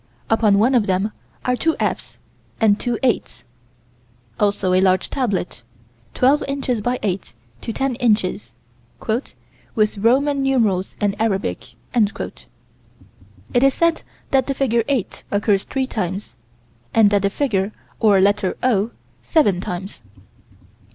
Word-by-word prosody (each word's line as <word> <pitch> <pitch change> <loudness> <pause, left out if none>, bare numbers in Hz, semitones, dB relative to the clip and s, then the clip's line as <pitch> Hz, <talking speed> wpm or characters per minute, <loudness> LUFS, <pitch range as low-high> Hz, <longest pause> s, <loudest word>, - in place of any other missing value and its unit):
Upon 215 -3 +4
one 235 +6 +3
of 235 -5 +3
them 190 +3 0 0.3
are 250 - +2
two 320 +5 +1
"F's" - - -2 0.4
and 215 -2 +4
two 240 -2 -1
"8's." 245 -4 0 1.0
Also 200 -2 +1
a 185 - +4
large 185 -1 +2
tablet, 205 - -2 0.5
twelve 275 +4 +4
inches 270 -5 -1
by 245 +4 0
eight 190 - -2 0.3
to - - -4
ten 270 +3 -1
inches 215 -5 0 1.2
"with 215 -1 +2
Roman 275 +6 +2
numerals 225 -9 +1
and 205 -1 0
Arabic." 190 - -2 0.2
It 235 +2 -5
is 275 0 +4
said 335 -1 +2 0.3
that 265 -2 +3
the 275 - -1
figure 235 -4 +1
"8" 270 -8 -2
occurs 205 -1 +1
three 265 -1 -1
times, 195 - -4 0.6
and 215 -2 +6
the 200 -1 +2
figure 200 -4 0 0.3
or 205 -4 +5
letter 195 -1 +2
"O" 225 -4 +2 0.3
seven 205 - +2
times. 185 -5 -6
215 Hz, 125 wpm, -21 LUFS, 195-255 Hz, 1.2 s, and